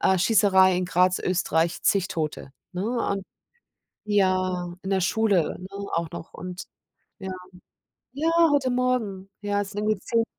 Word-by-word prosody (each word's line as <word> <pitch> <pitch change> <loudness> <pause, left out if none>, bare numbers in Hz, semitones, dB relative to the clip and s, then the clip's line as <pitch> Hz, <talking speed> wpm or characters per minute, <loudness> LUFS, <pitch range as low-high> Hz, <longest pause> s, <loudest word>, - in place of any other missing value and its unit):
„Äh, 190 - +3
Schießerei 190 -2 +4
in 180 - 0
Graz, 180 +1 +2
Österreich, 170 -2 0
zig 195 -2 +2
Tote“, 155 -5 -4 0.2
ne, 180 0 -3 0.3
und 200 -1 -2 0.8
ja, 185 -3 +1
in 190 - -4
der 190 -1 +1
Schule, 195 -3 +1
ne, 185 - -8 0.3
auch 170 -1 -1
noch 170 -1 -9
und 180 +1 -7 0.6
ja. 190 -2 -6 0.8
Ja, 310 +4 0 0.2
heute 265 -3 +2
Morgen, 240 -7 -1
ja, 205 0 0
es 200 0 -4
sind 205 - -4
irgendwie 215 -2 0
10 230 +1 +1
190 Hz, 150 wpm, -25 LUFS, 180-210 Hz, 0.8 s, Schießerei